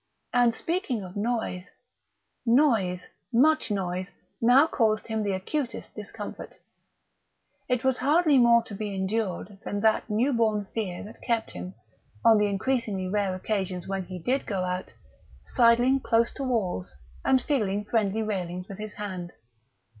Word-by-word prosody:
And 245 -2 +4
speaking 325 - -2
of 180 0 -9
noise: 210 -4 -2 0.7
noise, 230 -8 +2 0.2
much 305 +6 +3
noise, 185 -2 -2 0.3
now 250 +5 +6
caused 220 -8 +1
him 220 -1 -2
the 200 -2 0
acutest 240 +8 -3
discomfort. 210 0 -8 1.1
It 250 -2 +1
was 260 -1 +2
hardly 295 +1 +4
more 235 -1 +6
to 220 - -10
be 205 0 -4
endured 195 0 -2
than 205 - -3
that 220 +1 +2
new 235 +7 +2
born 215 -3 +1
fear 190 -6 -3
that 215 +3 -12
kept 230 -2 -1
him, 185 +1 -7 0.5
on 225 -2 +7
the 210 - +3
increasingly 200 -2 -1
rare 200 -2 0
occasions 185 -2 -3
when 195 0 -2
he 185 0 -7
did 250 +11 -1
go 195 -3 -1
out, 180 0 -3 0.5
sidling 245 +2 +4
close 235 -2 +2
to 275 - -5
walls 190 - -2 0.3
and 260 - +4
feeling 210 -8 -1
friendly 220 -1 0
railings 180 -3 -3
with 195 - -9
his 215 0 -6
hand. 185 -4 -6
215 Hz, 145 wpm, -27 LUFS, 190-240 Hz, 1.1 s, on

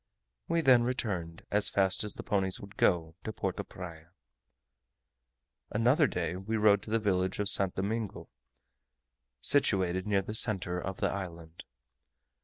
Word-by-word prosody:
We 165 0 +1
then 130 -5 +5
returned, 100 -10 -3
as 105 0 +3
fast 95 0 +1
as 105 - -5
the - - -7
ponies 95 -3 -1
would 100 0 -12
go, 80 -4 +1
to 110 - -4
Porto - - -3
Praya. 85 -3 -10 1.6
Another 125 +8 +3
day 90 -1 -3
we 105 +4 -3
rode 105 -2 +4
to - - -6
the 115 - +2
village 95 -4 0
of 105 - 0
St. 95 -2 +4
Domingo, 105 +2 -3 1.1
situated 95 - +2
near 100 -2 +1
the 105 - -6
centre 95 -6 +2
of 95 +1 -5
the - - +1
island. 85 -4 -8
100 Hz, 145 wpm, -30 LUFS, 90-110 Hz, 1.6 s, then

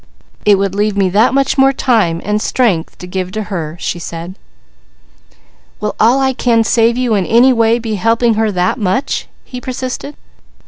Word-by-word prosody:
"It 205 -1 +6
would 195 -1 -1
leave 205 0 -1
me 195 -2 +2
that 215 +6 +3
much 275 0 +1
more 270 0 +5
time 215 -11 0
and 210 +1 0
strength 205 -12 0
to - - -9
give 185 0 -4
to 215 - -3
her," 165 -2 -4
she 175 - -3
said. 170 +1 -7 1.5
"Will 210 -1 -3
all 235 +5 +4
I 265 -1 +1
can 235 -3 +2
save 230 +1 +2
you 250 -3 0
in 195 -4 0
any 245 +3 +5
way 230 -1 +2
be 225 -2 -4
helping 230 +2 +2
her 220 0 0
that 180 +5 -1
much?" 205 +7 -1 0.2
he 250 -1 -8
persisted. 255 +3 -5
220 Hz, 180 wpm, -15 LUFS, 190-250 Hz, 1.5 s, It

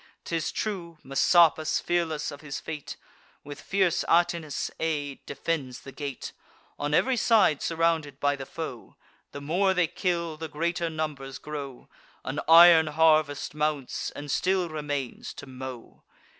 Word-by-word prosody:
'Tis 165 -1 -2
true, 175 -6 -4
Messapus, 155 +3 +4
fearless 170 -4 -1
of 145 0 -10
his 150 -2 -5
fate, 150 -3 -7 0.5
With 145 0 -9
fierce 190 -3 +1
Atinas' 170 -3 +1
aid, 145 -4 -2
defends 135 -7 -3
the 135 - -10
gate: 140 -2 -6 0.5
On 145 +1 0
ev'ry 260 +8 +3
side 220 - +3
surrounded 165 -4 0
by 145 0 +2
the 135 -1 -8
foe, 135 -8 -7 0.4
The 140 - -8
more 185 +6 +1
they 180 -1 +3
kill, 170 -1 -2
the 160 +1 -5
greater 170 +3 -1
numbers 150 -4 -4
grow; 140 -4 -7 0.4
An 135 +3 -3
iron 165 -1 +9
harvest 155 -2 +2
mounts, 150 -3 -2
and 145 -1 -6
still 185 +1 +1
remains 145 -4 -4
to - - -9
mow. 130 -2 -9
155 Hz, 140 wpm, -27 LUFS, 145-170 Hz, 0.5 s, iron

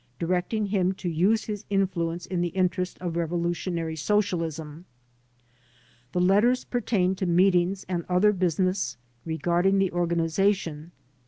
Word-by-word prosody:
directing 180 - -1
him 190 -2 +1
to 190 - -7
use 185 +7 +2
his 210 -1 -5
influence 175 -4 -1
in 180 -1 -2
the 175 - +1
interest 180 0 0
of 175 -2 -4
revolutionary 170 0 -2
socialisnu 165 -4 -1 1.3
The 180 - -1
letters 205 +8 +3
pertained 195 -6 0
to 190 - -1
meetings 180 +1 +2
and 175 -2 -2
other 180 +4 +4
business 185 +1 0 0.3
regarding 175 +4 +1
the 195 -2 +2
organiza 175 +3 +1
tion. 160 -2 -8
180 Hz, 130 wpm, -26 LUFS, 170-195 Hz, 1.3 s, other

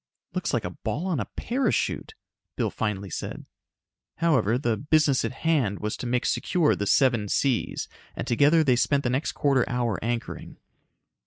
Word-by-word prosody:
"Looks - - -1
like - - -1
a - - -3
ball 160 +7 -4
on 180 -7 0
a 105 - -2
parachute," 250 -1 -1 0.4
Bill - - -1
finally 100 -4 -3
said. - - -5 0.7
However, 130 - +2
the 120 -4 0
business 150 0 +2
at - - -1
hand 135 -8 0
was 105 +2 -3
to 125 - -5
make 125 0 0
secure 170 -4 +2
the 100 - -3
Seven 115 -1 +3
Seas 130 0 0 0.3
and - - -4
together 145 +7 +4
they 130 -4 +3
spent 140 +3 +2
the 120 - 0
next 130 +4 -1
quarter 135 -3 +2
hour 120 -5 -1
anchoring. 120 0 -4
130 Hz, 165 wpm, -26 LUFS, 115-150 Hz, 0.7 s, together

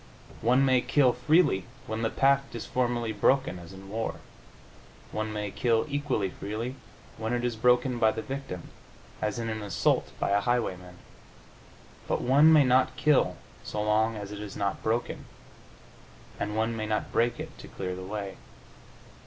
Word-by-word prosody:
One 125 +4 +4
may 130 -2 +4
kill 130 -1 +3
freely 140 - +3 0.2
when 110 +1 -3
the 115 - +1
pact 140 0 +2
is 115 - -5
formally 120 -2 0
broken, 110 -1 +2
as 85 +1 -11
in 95 0 -11
war. 105 -4 -3 1.0
One 110 0 -2
may 105 -1 -3
kill 115 0 +1
equally 140 -9 -1
freely 110 +7 -4 0.5
when 110 +1 -2
it 120 0 0
is 120 -2 -1
broken 125 +2 +3
by 110 - +5
the 110 - -4
victim, 135 -10 -6 0.5
as 105 0 -1
in 115 -1 -3
an 110 -1 -3
assault 100 -1 +1
by - - 0
a 100 0 +3
highwayman. 90 -7 -1 1.1
But - - 0
one 140 +6 +6
may 155 -2 +7
not 130 0 +3
kill 150 +1 +3 0.3
so 105 - -3
long 110 +1 +2
as 100 -1 -6
it 105 - -6
is 105 -2 -7
not 100 0 -1
broken, 115 +2 -2 1.1
and 105 +1 -2
one 115 +1 0
may 110 -1 -3
not 110 0 -1
break 120 +1 +1
it - - -7
to - - -10
clear 90 -1 -5
the 95 - -7
way. 100 +1 -5
115 Hz, 170 wpm, -28 LUFS, 105-125 Hz, 1.1 s, may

